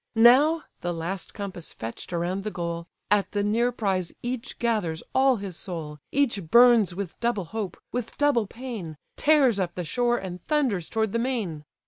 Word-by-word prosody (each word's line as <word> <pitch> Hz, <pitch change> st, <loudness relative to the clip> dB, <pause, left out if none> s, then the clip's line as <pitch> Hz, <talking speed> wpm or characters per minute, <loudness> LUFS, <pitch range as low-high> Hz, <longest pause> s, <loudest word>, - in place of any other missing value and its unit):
Now 275 Hz, +8 st, +6 dB, 0.2 s
(the 175 Hz, -1 st, -2 dB
last 170 Hz, +3 st, -4 dB
compass 195 Hz, -5 st, -6 dB
fetch'd 115 Hz, +8 st, -7 dB
around 175 Hz, +3 st, -1 dB
the 215 Hz, -, -2 dB
goal) 170 Hz, -3 st, -4 dB, 0.2 s
At 205 Hz, -1 st, +2 dB
the 205 Hz, -1 st, +1 dB
near 230 Hz, +4 st, +2 dB
prize 190 Hz, -7 st, -1 dB
each 245 Hz, -1 st, -4 dB
gathers 210 Hz, -9 st, 0 dB
all 265 Hz, 0 st, +5 dB
his 195 Hz, -5 st, -6 dB
soul, 160 Hz, -5 st, -6 dB
Each 260 Hz, -7 st, +1 dB
burns 235 Hz, -4 st, +6 dB
with 195 Hz, -3 st, -5 dB
double 235 Hz, -6 st, 0 dB
hope, 200 Hz, 0 st, -4 dB
with 245 Hz, -2 st, -4 dB
double 280 Hz, -7 st, +3 dB
pain, 220 Hz, -, -7 dB, 0.2 s
Tears 275 Hz, -8 st, +4 dB
up 175 Hz, -2 st, -1 dB
the 180 Hz, -, -3 dB
shore, 240 Hz, +6 st, +1 dB
and 180 Hz, -4 st, -6 dB
thunders 245 Hz, -, +1 dB
toward 220 Hz, -2 st, 0 dB
the 230 Hz, -, 0 dB
main. 215 Hz, -, -2 dB
205 Hz, 170 wpm, -26 LUFS, 175-240 Hz, 0.2 s, Now